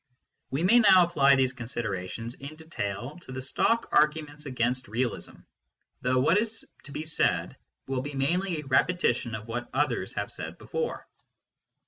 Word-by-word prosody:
We 140 +5 -1
may 235 +7 +6
now 190 -5 +7
apply 140 -5 +5
these 130 -1 +2
considerations 115 -2 -4
in 140 +3 -9
detail 140 - -5
to 130 - -12
the 130 - -4
stock 230 - +1
arguments 150 -1 +1
against 125 0 -1
realism, 120 +3 -3 0.6
though 130 0 +1
what 170 +9 +4
is 225 0 -2 0.2
to 145 - -11
be 150 +3 -4
said 155 - 0 0.3
will 130 -1 -1
be 145 +1 -6
mainly 170 +6 0
a - - -13
repetition 130 -4 +2
of 110 +1 -8
what 120 +1 -4
others 130 -9 0
have 100 0 -3
said - - -7
before. - - -4
135 Hz, 155 wpm, -28 LUFS, 120-160 Hz, 0.6 s, now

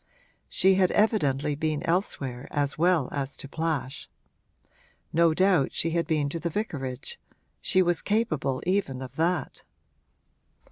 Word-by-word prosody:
She 190 +1 +4
had 185 -1 +3
evidently 150 - +2
been 155 0 -2
elsewhere 140 -8 -2
as 145 -2 0
well 170 -4 +2
as 140 -1 -3
to - - -6
Plash; 150 -3 -3 1.0
no 165 -1 +4
doubt 185 -6 +3
she 165 - +1
had 170 0 0
been 155 -4 +1
to 165 - -4
the 170 +2 -2
vicarage 140 - -4 0.4
she 185 - +3
was 175 -1 +2
capable 155 - 0
even 175 -9 0
of 130 0 -10
that. 165 -2 -1
160 Hz, 135 wpm, -27 LUFS, 140-180 Hz, 1.0 s, She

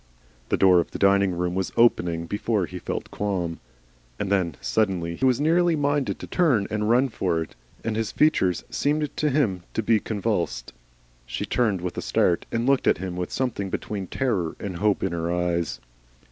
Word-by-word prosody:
The - - +2
door 95 -2 +6
of 85 - -1
the - - -6
dining 100 -2 +3
room 90 0 -1
was 95 0 -2
opening 85 -8 +3
before 105 +2 -1
he 90 +1 -8
felt - - -4
a - - -18
qualm. 90 -5 -2 0.6
And 100 - -3
then 90 -6 +1
suddenly 90 -6 0
he 130 - 0
was 130 -1 +3
nearly 170 +3 +3
minded 145 -2 0
to - - -8
turn 140 - +2
and 105 0 0
run 125 +4 +4
for 90 -7 -1
it, 80 - -14 0.3
and 110 - -2
his 110 -1 -1
features 95 - +2
seemed 150 0 0
to 150 - +1
him 125 -11 +1
to 110 - 0
be 110 0 +3
convulsed. 100 - -2 0.5
She - - -3
turned 110 -7 +1
with 90 -1 -4
a - - -3
start, 85 - +1
and 115 +1 0
looked 135 0 +2
at - - +4
him 90 +1 -5
with 90 0 -4
something 115 -7 -2
between 100 0 -4
terror 100 -12 -1
and 95 -4 -5
hope 105 +1 +1
in 95 - 0
her 85 0 -2
eyes. 85 -6 -1
100 Hz, 195 wpm, -25 LUFS, 90-120 Hz, 0.6 s, door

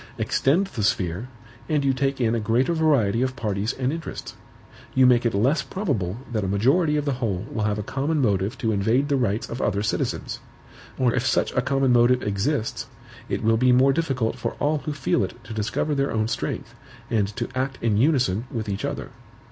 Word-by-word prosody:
Extend 160 +9 +2
the 130 - -5
sphere, 95 +2 0 0.4
and 150 -2 +1
you 135 - +3
take 135 +1 -1
in 115 -2 +2
a 115 - +1
greater 115 +8 +1
variety 140 -10 +2
of 130 0 0
parties 105 -2 -2
and 130 +2 -1
interests; 165 0 -6 0.6
you 130 -1 +6
make 120 -1 +5
it 115 - -2
less 130 +10 +2
probable 115 - -2
that 110 -3 -1
a - - -1
majority 140 - +2
of 150 - -1
the 140 - +1
whole 100 -4 -1
will 110 -2 -1
have 105 -1 0
a 105 - -3
common 140 +8 -1
motive 100 -5 +1
to 110 - 0
invade 110 +8 +1
the 140 - +3
rights 115 -5 0
of 120 - -5
other 100 +2 0
citizens; 105 - -2 0.6
or 125 -3 +2
if 125 - 0
such - - +1
a - - +1
common 135 -2 +2
motive 120 +1 +4
exists, 110 +5 -1 0.4
it - - -2
will 115 +1 +3
be 125 +2 +4
more 130 +2 +5
difficult 135 -8 -1
for - - -2
all 150 +1 0
who 150 - -4
feel 140 -7 0
it 95 - -4
to 110 0 -8
discover 110 +8 -1
their 140 0 0
own 110 -1 0
strength, 120 - -4 0.4
and 105 -3 +2
to 120 -2 -2
act 130 +1 -1
in 115 -3 +1
unison 125 - +2
with 115 -6 -4
each 100 -1 -3
other. - - -4
125 Hz, 205 wpm, -24 LUFS, 110-140 Hz, 0.6 s, you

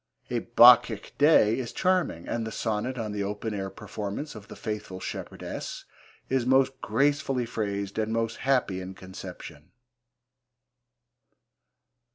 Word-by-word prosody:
A 120 - +1
Bacchic 120 -2 +6
Day 140 -7 +5
is 120 -3 -4
charming, 180 - 0
and 115 - -2
the - - -5
sonnet 110 +4 -2
on 110 -3 -3
the 105 -1 -3
open 105 +2 -3
air 95 -1 -3
performance 105 +7 -6
of 105 -2 -11
The - - -10
Faithfull 105 -4 -5
Shepherdesse - - -6 0.4
is 130 -1 +1
most 130 +1 +2
gracefully 140 -3 +1
phrased 100 -3 -3
and 110 0 -1
most 115 0 -1
happy 125 -9 +1
in 95 +1 -8
conception. 90 -5 -10
110 Hz, 130 wpm, -27 LUFS, 100-130 Hz, 0.4 s, Bacchic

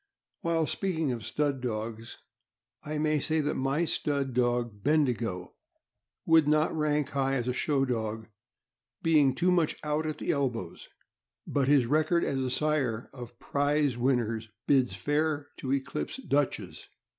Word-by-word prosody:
While 165 -1 +1
speaking 160 -5 -1
of 115 -3 -4
stud 145 -1 -1
dogs, 115 -1 -4 0.7
1 150 0 -3
may 155 -1 +2
say 160 +3 0
that 150 +1 -1
my 135 +5 0
stud, 140 -4 -1
dog 120 -4 0
Bendigo 120 - 0 0.7
would 160 -2 +5
not 155 +2 +2
rank 150 -2 +1
high 135 -1 0
as 125 -2 -1
a 125 - 0
show 135 0 +1
dog, 110 -3 -3 0.8
being 150 -5 +4
too 180 +7 +2
much 170 -4 +2
out 150 +1 -1
at 155 - -4
elbows, 120 - -2 0.6
but 140 -2 0
his 140 -3 +5
record 155 +6 +2
as 135 - -1
a 130 -1 -1
sire 130 -5 0
of 120 -2 -10
prize 145 -1 +1
win 125 +2 +2
ners 115 -1 -3 0.2
bids 130 -3 +3
fair 145 -1 -1
to 130 - -4
eclipse 135 - -2
Dutch's. 145 - -2
140 Hz, 145 wpm, -29 LUFS, 120-150 Hz, 0.8 s, would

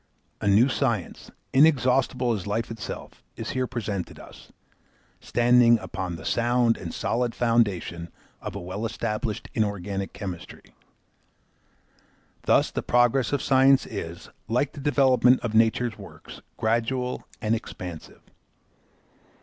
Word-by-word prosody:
A - - -1
new 105 +6 +5
science, 120 -8 -2 0.2
inexhaustible 130 -3 +3
as 100 -3 -4
life 110 +3 -2
itself, 115 -3 -7
is - - -5
here 130 0 -1
presented 105 -7 -4
us, - - -14 0.7
standing 120 0 +4
upon 95 -6 -5
the 80 -1 -10
sound 120 +3 +2
and 85 -3 -7
solid 120 0 -1
foundation 100 -8 0 0.3
of - - -6
a - - -4
well 95 +4 -6
established 110 -1 -3
inorganic 100 -2 -2
chemistry. 95 -5 -8 1.7
Thus - - +3
the - - -2
progress 120 +1 +2
of 145 -2 0
science 135 0 +5
is, 85 +1 -7 0.2
like 125 +6 0
the - - -10
development 130 -3 +4
of 115 -3 -3
nature's 115 +1 +2
works, - - -12 0.2
gradual 120 +3 -1
and 110 +1 0
expansive. 90 -7 -7
115 Hz, 120 wpm, -25 LUFS, 100-125 Hz, 1.7 s, new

